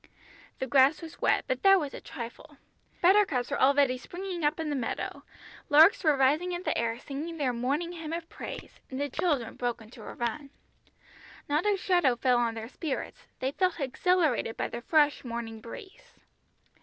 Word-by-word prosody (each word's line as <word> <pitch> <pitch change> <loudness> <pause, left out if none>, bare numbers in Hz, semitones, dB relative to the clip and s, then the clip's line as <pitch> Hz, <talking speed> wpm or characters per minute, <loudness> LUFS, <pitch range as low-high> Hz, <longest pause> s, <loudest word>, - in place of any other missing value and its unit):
The - - -2
grass 270 +3 +4
was 320 - -10
wet, - - +2
but - - -1
that 390 -1 +6
was 290 -4 -4
a - - -8
trifle. 260 +5 -9 0.5
Buttercups 350 -10 +4
were - - -1
already 270 -1 +4
springing 355 +4 -6
up 295 +2 +1
in 315 -2 -2
the - - -1
meadow; 250 -4 -3 0.5
larks 315 +6 +6
were 305 -4 +4
rising 300 +7 +2
in 350 +1 -4
the - - -1
air 230 0 -1
singing 300 +6 -6
their 265 -5 0
morning 280 +8 -1
hymn 325 -3 -7
of 335 0 -4
praise, - - -9
and 260 - -5
the 285 -1 -2
children 275 -8 0
broke 240 -1 -2
into 225 +2 -13
a - - -9
run. 275 +5 -3 1.0
Not 300 +7 +1
a 410 -1 +3
shadow 350 -9 +2
fell 250 0 +2
on 230 -1 0
their 225 0 -6
spirits, 280 +2 -5
they 260 +1 -2
felt 365 +2 0
exhilarated 290 -3 +1
by - - -2
the 235 - -6
fresh 295 +1 +2
morning 230 -2 -5
breeze. 385 - -12
285 Hz, 180 wpm, -29 LUFS, 245-335 Hz, 1.0 s, that